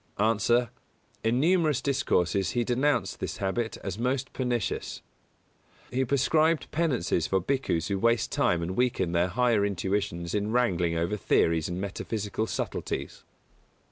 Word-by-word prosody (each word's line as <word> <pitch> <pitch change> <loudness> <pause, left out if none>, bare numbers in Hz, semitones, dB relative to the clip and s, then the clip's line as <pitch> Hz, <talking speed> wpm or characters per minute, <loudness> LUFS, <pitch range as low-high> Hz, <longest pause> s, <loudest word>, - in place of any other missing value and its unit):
_ 110 +1 +2
A. 120 0 +3 0.5
In 115 +3 +2
numerous 160 -1 +3
discourses 95 - +1
he 120 - +3
denounced 125 +2 0
this - - -4
habit 110 +4 -2
as 95 +2 -4
most 130 +2 -1
pernicious. 120 -5 -2 0.9
He 130 +2 +1
prescribed 155 +5 +2
penances 125 - 0
for 95 - +2
Bhikkhus 95 - -1
who 100 -1 -1
waste 115 +1 +2
time 85 -1 +1
and 90 +3 -3
weaken 120 -8 +1
their 85 +1 +2
higher 115 +2 +2
intuitions 95 -3 -2
in 105 +1 -1
wrangling 90 -9 +1
over 85 +6 -1
theories 80 -4 +2
and 90 +1 -3
metaphysical 105 +2 -3
subtleties. - - -4
110 Hz, 140 wpm, -28 LUFS, 95-125 Hz, 0.9 s, A